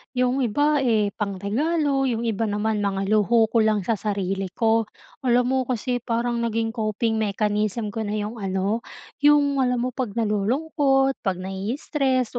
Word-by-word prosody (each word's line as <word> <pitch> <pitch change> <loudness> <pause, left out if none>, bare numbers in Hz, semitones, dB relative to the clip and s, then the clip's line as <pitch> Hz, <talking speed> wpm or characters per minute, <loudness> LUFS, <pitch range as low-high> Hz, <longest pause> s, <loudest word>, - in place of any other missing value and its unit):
'Yong 250 0 +1
iba, 290 +6 +2
eh, 220 -6 +2
pang-regalo, 270 - 0
'yong 235 -1 -1
iba 225 -1 -1
naman 210 +1 -1
mga 195 -1 -1
luho 220 +1 +3
ko 230 - +3
lang 215 -2 +2
sa 220 +2 -1
sarili 195 -2 -2
ko. 225 -1 +2 0.4
Alam 245 +1 +3
mo, 265 - +2
kasi 245 0 -1
parang 235 0 -1
naging 230 -1 -1
coping 220 0 -1
mechanism 210 +1 -1
ko 225 - -5
na 210 - -2
'yong 215 +2 -4
ano 195 +2 -1 0.4
'yong 290 -1 +4
alam 250 -2 +1
mo, 255 - -1
'pag 250 -5 -4
nalulungkot 270 - +1
'pag 190 -4 -1
nai-stress 245 - -1
225 Hz, 155 wpm, -24 LUFS, 210-255 Hz, 0.4 s, yong